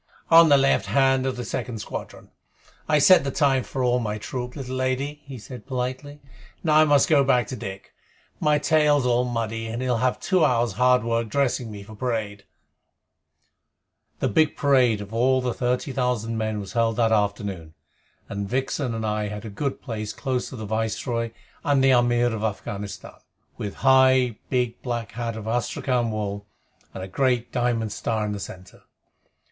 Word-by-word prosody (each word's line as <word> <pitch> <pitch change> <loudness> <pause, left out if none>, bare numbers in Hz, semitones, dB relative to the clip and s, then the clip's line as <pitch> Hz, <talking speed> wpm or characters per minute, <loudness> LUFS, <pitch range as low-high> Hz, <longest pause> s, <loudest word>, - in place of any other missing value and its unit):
"On 165 0 +8
the 140 - +7
left 135 0 +2
hand 135 -1 +2
of 130 -1 -2
the 125 - -4
second 120 -3 -4
squadron. 105 - -8 0.6
I 155 - +4
set 180 +2 +6
the 140 - -2
time 135 -2 +2
for 130 +1 -4
all 125 0 +2
my 105 -3 -3
troop, 125 +3 -5
little 130 -3 -5
lady," 130 +3 -2
he 135 -2 -8
said 125 +3 -10
politely. 130 +3 -4 0.4
"Now 155 -3 +3
I 155 - +7
must 145 -2 +4
go 145 -3 +4
back 125 -3 +3
to 130 - -4
Dick. 95 -3 -8 0.5
My 150 -1 +3
tail's 150 -2 +3
all 125 0 +2
muddy, 115 -2 -3
and 115 +1 -4
he'll 125 -2 0
have 125 +1 0
two 185 -4 +2
hours' 120 -5 +2
hard 125 0 +3
work 115 -1 -1
dressing 125 -2 0
me 105 -2 -8
for 110 +2 -12
parade." 105 -3 -3 1.7
The - - 0
big 150 +7 +2
parade 125 -7 +3
of 105 +1 -9
all 130 +3 +3
the 125 -2 -1
thirty 125 +3 -1
thousand 125 -4 -1
men 110 -1 -2
was 100 -2 -7
held 115 -1 +1
that 115 0 +2
afternoon, 100 -6 -1 0.5
and 100 0 -4
Vixen 130 -1 -1
and 110 -1 -3
I 105 0 -1
had 105 +2 -7
a 110 - -6
good 135 +7 -4
place 110 -4 -4
close 130 0 -2
to - - -9
the 110 -3 -6
Viceroy 115 +2 -2 0.3
and 140 -2 +2
the 135 - +5
Amir 120 -1 +3
of 110 - -4
Afghanistan, 105 -1 -5 0.4
with 100 -2 -5
high, 130 -3 +5
big 125 -2 -1
black 120 -4 -4
hat 115 0 -4
of 110 -1 -7
astrakhan 120 +1 0
wool 100 -1 -4 0.4
and 95 - -7
the - - -6
great 125 +3 0
diamond 120 -3 0
star 110 0 -2
in 105 - -3
the 105 - -4
center. 95 -1 -10
120 Hz, 180 wpm, -24 LUFS, 110-130 Hz, 1.7 s, On